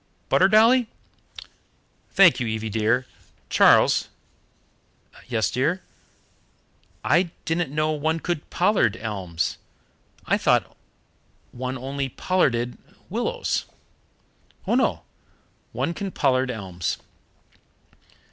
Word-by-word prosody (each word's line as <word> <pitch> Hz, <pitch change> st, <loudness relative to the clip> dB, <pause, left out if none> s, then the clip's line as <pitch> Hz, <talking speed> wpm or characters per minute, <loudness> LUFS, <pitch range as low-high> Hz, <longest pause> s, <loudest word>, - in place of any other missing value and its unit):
"Butter, 185 Hz, -, +5 dB
Dolly?" 225 Hz, +3 st, +5 dB, 1.2 s
"Thank 190 Hz, -6 st, +5 dB
you, 120 Hz, -, -2 dB
Evie 110 Hz, 0 st, -3 dB
dear. 115 Hz, +4 st, +1 dB, 0.5 s
Charles -, -, +5 dB, 0.6 s
" -, -, -35 dB
"Yes, 110 Hz, -6 st, 0 dB
dear?" 155 Hz, +9 st, 0 dB, 1.2 s
"I 175 Hz, 0 st, +3 dB, 0.2 s
didn't 165 Hz, -2 st, -1 dB
know 155 Hz, +1 st, 0 dB
one 160 Hz, +2 st, -1 dB
could 170 Hz, -2 st, -4 dB
pollard 175 Hz, -, +2 dB
elms. 95 Hz, -8 st, -3 dB, 0.7 s
I -, -, +1 dB
thought -, -, +1 dB, 0.8 s
one 130 Hz, +1 st, -4 dB
only 135 Hz, +1 st, -4 dB
pollarded 120 Hz, -8 st, 0 dB, 0.3 s
willows." -, -, -1 dB, 1.0 s
"Oh -, -, 0 dB
no, -, -, +1 dB, 0.7 s
one 135 Hz, +7 st, -2 dB
can 200 Hz, +2 st, -4 dB
pollard 130 Hz, -6 st, +1 dB
elms." 95 Hz, -7 st, -4 dB
130 Hz, 95 wpm, -24 LUFS, 115-175 Hz, 1.2 s, Butter